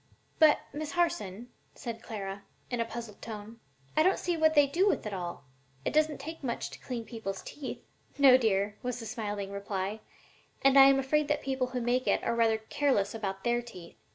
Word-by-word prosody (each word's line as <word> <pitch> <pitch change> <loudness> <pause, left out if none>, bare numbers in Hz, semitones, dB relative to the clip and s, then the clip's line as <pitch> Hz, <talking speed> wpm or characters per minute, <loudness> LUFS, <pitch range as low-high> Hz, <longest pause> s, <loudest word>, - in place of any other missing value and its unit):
"But, 310 -2 +6
Miss 300 +1 -4
Harson," 245 - -1 0.3
said 230 -4 -6
Clara, 200 -3 -6 0.3
in 245 - -1
a 230 - +1
puzzled 230 -3 -8
tone, 220 0 -8 0.4
"I - - +5
don't 375 +4 +4
see 350 -1 -1
what 315 0 +3
they 290 -1 +7
do 340 +8 +2
with 400 - +1
it 210 - -4
all. 175 -6 -5 0.4
It - - -1
doesn't 305 -1 +2
take 320 +3 -8
much 235 -3 -3
to - - -10
clean 240 -3 -5
people's 220 -5 -5
teeth." 290 -3 -7 0.3
"No, 275 -3 +8
dear," 205 -4 +1
was 250 -1 -3
the 225 - -7
smiling 205 -3 -4
reply, 200 +1 -3 0.6
"and 275 0 +5
I 270 -1 +10
am 275 0 +6
afraid 285 +3 +1
that 295 0 0
the - - -16
people 265 -1 0
who 250 -1 -3
make 245 +2 0
it - - +2
are - - 0
rather 225 -1 +3
careless 220 -1 0
about 195 -3 -4
their 240 0 +1
teeth. 180 -8 -12
240 Hz, 205 wpm, -30 LUFS, 210-280 Hz, 0.6 s, I